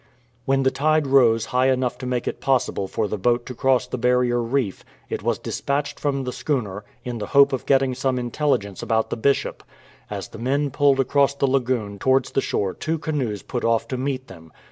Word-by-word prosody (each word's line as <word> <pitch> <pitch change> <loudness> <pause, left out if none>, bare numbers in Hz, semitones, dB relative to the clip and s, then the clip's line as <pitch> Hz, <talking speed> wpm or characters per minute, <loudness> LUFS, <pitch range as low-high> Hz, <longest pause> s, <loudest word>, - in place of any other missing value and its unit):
When 135 0 +2
the 130 - +3
tide 155 +1 +2
rose 120 -5 +4
high 130 +1 +3
enough 125 -1 0
to 125 - -5
make 125 -1 -2
it - - -4
possible 130 -7 0
for 110 +2 -1
the 105 - -4
boat 120 +4 +1
to 125 - -6
cross 130 0 +2
the 125 0 -5
barrier 125 0 +2
reef, 115 -4 -1 0.3
it - - -2
was - - 0
dispatched 140 +1 -3
from 140 -2 -1
the 125 -1 -4
schooner, 105 -9 -2 0.2
in 120 -2 -4
the 105 - -4
hope 140 0 +7
of 130 - -3
getting 135 -1 +3
some 130 0 -1
intelligence 120 -5 -1
about 110 -1 0
the - - 0
Bishop. 140 +5 0 0.5
As - - -5
the - - -10
men 140 +4 0
pulled 140 0 +3
across 140 +1 +2
the 140 - +1
lagoon 125 -6 0
towards 130 +2 +2
the 135 - +1
shore 95 -7 -1
two 160 +1 -2
canoes 135 - -3
put 120 - -4
off 115 -1 +1
to 130 - -2
meet 130 0 -2
them. 80 -4 -13
130 Hz, 210 wpm, -23 LUFS, 115-135 Hz, 0.5 s, hope